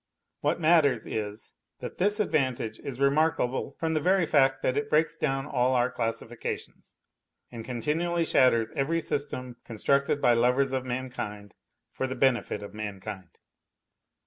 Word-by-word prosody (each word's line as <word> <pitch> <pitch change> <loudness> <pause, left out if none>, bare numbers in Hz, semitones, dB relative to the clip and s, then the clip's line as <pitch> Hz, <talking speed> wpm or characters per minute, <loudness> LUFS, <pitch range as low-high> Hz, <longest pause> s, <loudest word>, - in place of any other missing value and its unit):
What 150 +4 0
matters 155 -8 +4
is, 105 -1 -5 0.3
that - - -8
this 205 +3 +3
advantage 130 - 0
is 135 -2 -7
remarkable 140 -2 +1
from 160 -1 0
the 155 - +2
very 185 +3 +3
fact 135 -3 +3
that 130 - +1
it 145 0 -1
breaks 155 +1 +2
down 135 -4 -1
all 130 -2 +1
our 125 +1 +2
classifications, 115 -2 -5 0.6
and 115 -2 -7
con 120 -1 -5
tinually 170 +2 0
shatters 115 -3 +3
every 160 +5 0
system 130 -5 -3
constructed 140 +6 +1
by 125 -3 +4
lovers 125 +3 +2
of 130 -1 -2
mankind 120 -5 -5 0.4
for 130 - -2
the 130 - -4
benefit 125 -5 +1
of 100 - -9
mankind. 100 -3 -7
130 Hz, 145 wpm, -28 LUFS, 120-150 Hz, 0.6 s, matters